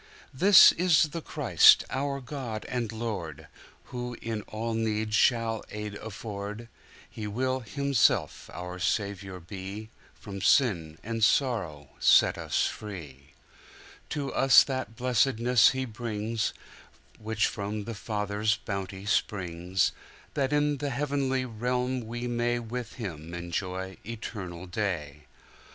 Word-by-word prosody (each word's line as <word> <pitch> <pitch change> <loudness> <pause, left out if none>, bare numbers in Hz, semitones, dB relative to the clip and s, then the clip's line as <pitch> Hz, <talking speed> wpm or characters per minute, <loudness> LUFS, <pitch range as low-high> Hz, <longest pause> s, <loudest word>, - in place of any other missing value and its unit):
This 190 +8 +8
is 160 -4 +3
the 165 +3 -5
Christ, - - +5
our 140 +1 -1
God 120 -5 -5
and 120 -3 -2
Lord, 90 -10 -5 0.5
Who 125 -1 -4
in 115 -2 -4
all 115 +1 -3
need 110 -1 -1
shall 115 0 +2
aid 105 0 -5
afford:He 105 +1 -8
will 130 +5 -1
Himself 140 +1 +1
our 90 +1 -7
Saviour 95 -1 -2
be, 95 +5 -8 0.2
From 100 -2 -8
sin 85 - +2
and 115 0 -3
sorrow 100 - +1
set - - +5
us - - 0
free. 75 -9 -8 0.7
To 140 -2 -3
us 135 -1 +7
that 130 -5 -4
blessedness 125 -1 +4
He 130 0 -2
brings, 110 -1 -3 0.7
Which 110 0 0
from 105 0 -3
the 115 - -5
Father's 105 0 -1
bounty 100 -1 -5
springs:That 95 +7 -1
in 150 0 +2
the 145 +1 -2
heavenly 135 -1 -1
realm 125 +1 -2
we 120 +1 -5
mayWith 120 0 -2
Him 85 -7 -6
enjoy 95 +2 -4
eternal 95 -6 -6
day. 85 -7 -3
110 Hz, 115 wpm, -28 LUFS, 100-125 Hz, 0.7 s, This